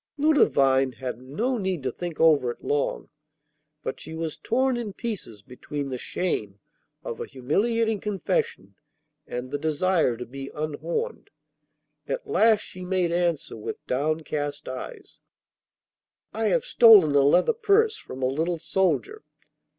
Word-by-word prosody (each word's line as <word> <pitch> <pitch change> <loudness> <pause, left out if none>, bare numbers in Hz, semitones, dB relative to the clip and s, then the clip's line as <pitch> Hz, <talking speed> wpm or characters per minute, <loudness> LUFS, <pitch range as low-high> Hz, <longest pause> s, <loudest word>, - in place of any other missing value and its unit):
Ludovine 135 - +3
had 125 +1 -6
no 220 - -2
need 185 -7 -2
to 130 - -1
think 175 +4 -6
over 155 -6 +5
it 120 - -7
long, 145 -1 -1 0.7
but - - -4
she 160 - -8
was 160 -1 -3
torn 260 +2 +1
in 230 -4 -4
pieces 190 - -6
between 135 +4 -6
the 130 - -3
shame 105 - -2 0.4
of 115 - -5
a - - -4
humiliating 215 - 0
confession, 445 - -2 0.5
and 125 +1 -5
the 145 - -2
desire 155 -4 +1
to 125 - -6
be 135 +2 -8
unhorned. 155 - -3 0.8
At - - -3
last 225 - +4
she 185 - -9
made 180 -2 0
answer 170 -3 0
with 110 - -7
downcast 145 +1 -2
eyes, 130 0 -8 1.1
'I 225 +1 -1
have 205 - +2
stolen 210 -11 +7
a 140 - +5
leather 175 - +4
purse 440 0 +3
from 130 - -8
a - - +3
little 160 +6 -1
soldier. 190 - 0
160 Hz, 140 wpm, -25 LUFS, 135-220 Hz, 1.1 s, stolen